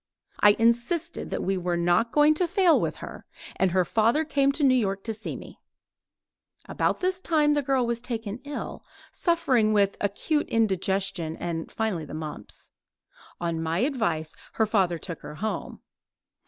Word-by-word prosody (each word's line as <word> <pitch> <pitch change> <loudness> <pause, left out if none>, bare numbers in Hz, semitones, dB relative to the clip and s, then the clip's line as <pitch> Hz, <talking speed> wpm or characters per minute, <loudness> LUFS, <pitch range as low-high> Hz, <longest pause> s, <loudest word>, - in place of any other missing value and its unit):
I 205 0 +6
insisted 240 +9 +1
that - - -3
we 195 0 0
were 175 -1 -1
not 175 +7 +2
going 300 +1 +5
to 345 +3 0
fail 365 -2 +4
with - - -1
her, - - -11 0.3
and 190 - +3
her 180 0 +2
father 230 - +2
came 275 -2 +2
to 295 - -1
New 265 -2 +6
York 195 -6 0
to 225 - -3
see 220 +1 -6
me. - - -11 1.1
About - - 0
this 370 0 0
time 305 -4 +3
the 295 - +2
girl 265 -2 +1
was 235 0 -2
taken 230 -3 -4
ill, 290 0 -6 0.3
suffering 275 - +2
with 200 -1 +2
acute 250 +10 0
indigestion 190 -6 0
and 165 -2 -4
finally 210 -8 -2
the 150 - -8
mumps. 155 -1 -5 0.7
On 170 -2 -2
my 165 +1 -1
advice 170 - -1 0.2
her 220 - +2
father 190 -5 +1
took 170 0 -7
her 150 - -8
home. 215 +7 -4
220 Hz, 165 wpm, -26 LUFS, 180-285 Hz, 1.1 s, I